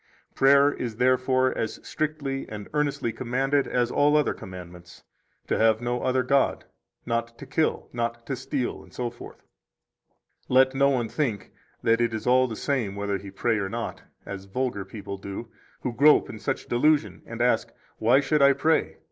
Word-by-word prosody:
6 - - -22
Prayer 140 +1 +6
is 115 -3 -4
therefore 130 +1 +2
as 110 - -3
strictly 145 -3 -3
and 105 -1 -7
earnestly 145 -5 0
commanded 135 +3 0
as 120 -1 0
all 150 +1 +4
other 150 - +2
commandments: 90 -1 -11 0.4
to - - -1
have 110 -1 +4
no 120 +1 -2
other 130 0 +1
God, 135 +2 +1 0.4
not 115 0 -2
to - - -9
kill, 155 +4 0
not 120 0 -3
to 135 - -2
steal, 130 0 -3
etc. 120 -1 -7 1.1
Let 130 +1 +5
no 140 +1 +3
one 125 -4 0
think 110 -5 -2 0.3
that 115 +1 +3
it 115 -1 +1
is 110 - -5
all 130 +1 +4
the 115 - -5
same 120 -7 -1
whether 100 -1 -2
he 100 +1 -9
pray 110 +3 0
or 95 -1 -2
not, 115 +2 -5 0.2
as 100 -1 -7
vulgar 105 -1 -2
people 100 0 -7
do, 100 +4 -7 0.3
who 125 - -3
grope 150 +5 +5
in 110 - -9
such - - -3
delusion 120 - +2
and 115 0 -7
ask, 125 +1 +1 0.3
Why 120 +5 +4
should 150 +1 +1
I 140 0 +7
pray? 155 +4 +1
125 Hz, 175 wpm, -26 LUFS, 110-135 Hz, 1.1 s, I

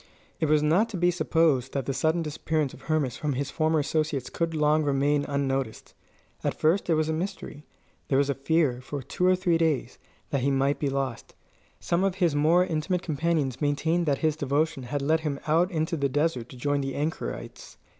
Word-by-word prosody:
It 160 - +1
was 150 -1 +4
not 180 +10 +3
to 205 - -5
be 175 +1 +3
supposed 160 -7 +1
that 135 -3 -2
the 135 - -1
sudden 160 +5 +1
disappearance 150 -1 -2
of - - -13
Hermas 150 -5 -1
from 150 - -5
among - - -4
his 140 +1 -2
former 160 0 +1
associates 150 -3 -1
could 165 -1 -2
long 150 0 +3
remain 145 0 +1
unnoticed. 135 -4 -2 0.5
At - - -2
first 170 +5 +2
it 165 - +4
was 155 0 +1
a 160 - 0
mystery. 160 -3 -5 0.4
There 135 - +2
was 140 0 +3
a 140 - +1
fear, 140 -3 +1
for 135 +1 -6
two 180 +8 0
or 185 - +5
three 175 -3 +1
days, 155 -7 0 0.3
that 140 - 0
he 140 - +1
might 135 +1 +1
be 145 - 0
lost. 135 -3 -4 0.4
Some 170 +2 0
of 195 -2 +1
his 175 -5 +2
more 160 +5 +4
intimate 170 +2 -1
companions 155 -4 -1
maintained 160 +4 +1
that 140 -2 +2
his 155 -1 +2
devotion 150 0 0
had 145 -1 -2
led 160 +3 +2
him 150 -3 -3
out 165 +4 +3
into 160 -2 -1
the 140 -3 0
desert 145 -4 0
to 130 - -11
join 145 +2 0
the 135 -1 -3
anchorites. 155 +3 -5
150 Hz, 205 wpm, -27 LUFS, 140-165 Hz, 0.5 s, or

